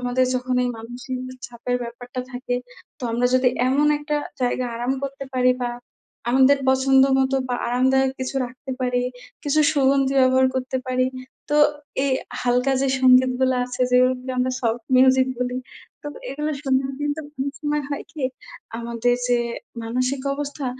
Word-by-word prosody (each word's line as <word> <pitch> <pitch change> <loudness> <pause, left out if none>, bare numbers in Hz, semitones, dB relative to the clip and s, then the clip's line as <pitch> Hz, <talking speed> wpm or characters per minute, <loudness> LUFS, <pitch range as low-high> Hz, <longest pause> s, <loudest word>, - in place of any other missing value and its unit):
আমাদের 250 +1 +1
যখন 255 0 -1
এই - - 0
মানসিক 245 +3 -6 0.3
চাপের 240 +1 -3
ব্যাপারটা 245 +2 -7
থাকে, 245 0 -2 0.4
তো - - -16
আমরা 245 +1 +2
যদি 255 0 +4 0.2
এমন 280 +3 +3
একটা 295 0 -2 0.2
জায়গায় 250 0 0
আরাম 245 +3 -1
করতে 275 0 -5
পারি 255 0 +4
বা 245 - 0 0.6
আমাদের 265 +2 +5
পছন্দমতো 265 0 +4
বা 250 - 0
আরামদায়ক 265 +2 +3
কিছু 260 +1 -3
রাখতে 255 +2 -10
পারি, 250 -1 +1 0.4
কিছু 305 +1 +2
সুগন্ধি 275 -1 +2
ব্যবহার 260 0 +5
করতে 260 0 -2
পারি, 255 0 +1 0.4
তো 295 - +1 0.5
এই 275 - +1 0.3
হালকা 250 +2 +2
যে, 275 - +1
সংগীতগুলা 255 0 +4
আছে 250 0 -7
যেগুলোকে 255 +1 +2
আমরা 255 +1 +1
সফট 230 0 0 0.2
মিউজিক 260 0 +5
বলি, 250 0 -1 0.4
তো - - -10 0.2
এগুলো 300 +3 -2
শুনলেও 265 -1 +1
কিন্তু 295 +1 -1 0.2
অনেক 275 +1 -2
সময় 295 0 -1
হয় 285 - -3
কি 300 - -7 0.6
আমাদের 235 +1 0
যে, 245 -1 +3 0.5
মানসিক 255 +3 -1
অবস্থা 285 -1 -4
255 Hz, 150 wpm, -23 LUFS, 250-270 Hz, 0.6 s, আমাদের